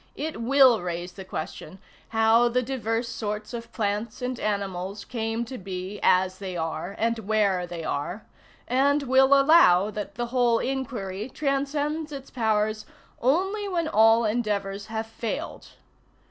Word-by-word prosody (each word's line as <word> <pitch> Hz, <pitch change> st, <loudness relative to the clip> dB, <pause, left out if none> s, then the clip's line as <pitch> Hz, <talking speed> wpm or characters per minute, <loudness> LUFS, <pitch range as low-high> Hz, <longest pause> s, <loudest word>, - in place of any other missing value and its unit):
It 305 Hz, -5 st, -4 dB
will 255 Hz, -2 st, +5 dB
raise 175 Hz, 0 st, -4 dB
the 190 Hz, +1 st, -9 dB
question, 185 Hz, -1 st, -7 dB, 0.3 s
how 225 Hz, +2 st, +4 dB
the 250 Hz, +1 st, +1 dB
diverse 235 Hz, -2 st, -2 dB
sorts 215 Hz, -1 st, -4 dB
of 230 Hz, -1 st, -7 dB
plants 210 Hz, +1 st, -2 dB
and 250 Hz, -1 st, -3 dB
animals 200 Hz, -1 st, -3 dB
came 225 Hz, -1 st, -2 dB
to 255 Hz, +2 st, -7 dB
be 190 Hz, +1 st, -6 dB
as 185 Hz, 0 st, +3 dB
they 185 Hz, -3 st, -5 dB
are 165 Hz, +3 st, -4 dB
and 230 Hz, +1 st, 0 dB
where 200 Hz, -4 st, +1 dB
they 175 Hz, -2 st, -6 dB
are, 175 Hz, +10 st, -3 dB, 0.4 s
and 280 Hz, +3 st, +2 dB
will 265 Hz, +1 st, +5 dB
allow 215 Hz, -, +6 dB
that 205 Hz, -1 st, -6 dB
the 240 Hz, +1 st, -2 dB
whole 240 Hz, -2 st, +3 dB
inquiry 240 Hz, -6 st, -3 dB
transcends 290 Hz, +3 st, -1 dB
its 275 Hz, -2 st, -8 dB
powers 215 Hz, -2 st, 0 dB, 0.3 s
only 385 Hz, -, +1 dB
when 340 Hz, -3 st, -1 dB
all 225 Hz, -3 st, +5 dB
endeavors 205 Hz, -2 st, -2 dB
have 220 Hz, 0 st, -3 dB
failed. 225 Hz, 0 st, -5 dB
225 Hz, 145 wpm, -26 LUFS, 200-260 Hz, 0.4 s, allow